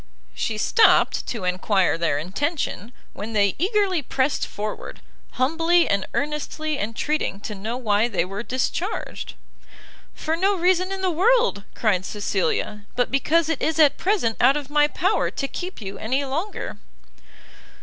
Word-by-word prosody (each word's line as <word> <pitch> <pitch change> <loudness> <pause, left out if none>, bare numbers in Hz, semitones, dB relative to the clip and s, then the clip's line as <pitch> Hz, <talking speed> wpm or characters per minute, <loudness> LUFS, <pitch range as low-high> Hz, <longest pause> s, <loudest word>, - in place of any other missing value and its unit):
She 220 - -2
stopt 440 - +4
to 225 -6 -4
enquire 185 +1 +1
their 165 -3 0
intention, 220 - -3 0.2
when 220 +2 -6
they 200 -2 +3
eagerly 385 -2 +1
pressed 265 +1 0
forward, 210 0 -6 0.3
humbly 330 +6 +3
and 200 -1 0
earnestly 300 +1 -2
entreating 230 +1 -2
to 210 - -5
know 215 +4 -4
why 215 -2 +2
they 180 -7 0
were 195 +3 -5
discharged? 260 - -3 0.8
"For 320 +1 -1
no 390 +4 +2
reason 365 +1 +2
in 385 0 -3
the 375 -1 +1
world," 440 - +2
cried 200 -5 +1
Cecilia, 205 +1 -2
"but 245 - +1
because 310 +4 +2
it 320 -4 -2
is 320 - 0
at 300 -3 +5
present 360 - +1
out 275 +2 +5
of 290 -1 -7
my 295 0 +4
power 375 +7 +1
to 275 - -3
keep 360 +6 -6
you 195 0 -6
any 260 +6 0
longer." 325 +10 -4
275 Hz, 150 wpm, -23 LUFS, 210-335 Hz, 0.8 s, at